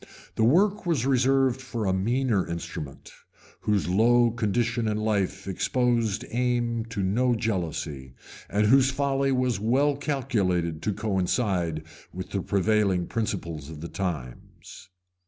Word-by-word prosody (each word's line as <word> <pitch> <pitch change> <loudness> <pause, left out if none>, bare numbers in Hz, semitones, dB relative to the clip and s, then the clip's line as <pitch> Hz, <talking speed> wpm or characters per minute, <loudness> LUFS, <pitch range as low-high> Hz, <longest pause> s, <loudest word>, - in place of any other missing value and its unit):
The 110 - +1
work 190 - +3
was 150 -8 +1
reserved 135 0 +2
for 120 -4 -4
a 95 - +1
meaner 115 +1 +1
instrument, 80 -4 -6 0.5
whose 105 -4 0
low 120 +5 +4
condition 120 +1 0
ir 105 - 0
life 105 -3 -1
exposed 115 +2 0
aim 120 -1 0
to 115 -4 -4
no 120 +6 +2
jealousy, 80 - -3 0.3
and 105 +1 +2
whose 135 +4 +5
folly 135 0 0
was 125 -5 +1
well 135 +7 +2
calculated 100 - -1
to 105 - -1
coincide 95 -5 -1 0.3
with 95 +1 -7
the 100 - -1
prevailing 100 -2 +1
principles 85 -10 -3
of 80 -2 -8
the 85 - -6
times. 85 - -6
110 Hz, 130 wpm, -26 LUFS, 95-125 Hz, 0.5 s, whose